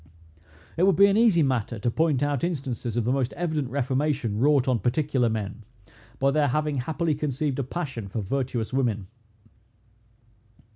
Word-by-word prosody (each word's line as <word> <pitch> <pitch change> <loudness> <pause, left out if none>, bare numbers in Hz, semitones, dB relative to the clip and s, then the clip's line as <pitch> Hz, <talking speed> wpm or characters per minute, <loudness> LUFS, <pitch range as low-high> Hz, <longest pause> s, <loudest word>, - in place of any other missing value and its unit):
It 170 - +2
would 195 - +4
be 200 - +7
an 200 0 +3
easy 215 -7 +4
matter 125 -4 -1
to 120 +4 -1
point 150 -1 +1
out 145 -2 -1
instances 130 -8 -3
of 120 - +1
the 125 - +1
most 130 -1 0
evident 155 -6 -2
reformation, 135 -3 -1
wrought 140 0 +3
on 125 -3 +2
particular 130 -1 +1
men, 110 0 -4 0.5
by 135 +1 +2
their 150 0 +2
having 150 +1 0
happily 155 +5 -1
conceived 145 -1 -2
a - - 0
passion 130 - -5
for 100 - -4
virtuous 120 +2 -2
women. 115 -7 0
135 Hz, 160 wpm, -25 LUFS, 120-150 Hz, 0.5 s, be